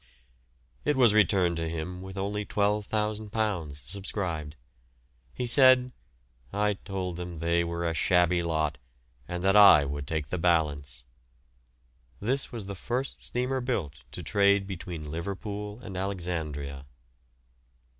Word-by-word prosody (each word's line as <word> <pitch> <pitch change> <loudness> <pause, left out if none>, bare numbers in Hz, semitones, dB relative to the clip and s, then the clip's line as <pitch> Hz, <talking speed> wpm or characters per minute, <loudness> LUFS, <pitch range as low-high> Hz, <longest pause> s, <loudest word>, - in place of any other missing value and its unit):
It 150 - +1
was 120 -5 +6
returned 95 -5 +3
to 80 0 -2
him 85 +3 -5
with 95 +1 -9
only 100 +2 -2
£12,000 105 -4 -1
subscribed. 85 -3 -4 0.8
He 125 - -4
said, 130 0 +6 0.6
"I 105 +1 +1
told 95 -3 -5
them 90 -1 -6
they 85 +1 +1
were 85 0 -3
a 85 - 0
shabby 90 +1 +3
lot, 80 -5 -1 0.5
and 90 0 -4
that 95 +1 +3
I 100 -8 +8
would 70 0 -4
take 75 -3 -3
the 90 - -2
balance." 75 -7 0 1.1
This 130 +6 -1
was 115 -4 -6
the 100 - -5
first 125 +7 -4
steamer 130 +2 -1
built 90 - -2
to - - -6
trade 100 -1 +3
between 85 -5 -6
Liverpool 100 +5 -5
and 95 - -8
Alexandria. 80 -8 -4
90 Hz, 125 wpm, -28 LUFS, 80-105 Hz, 1.1 s, I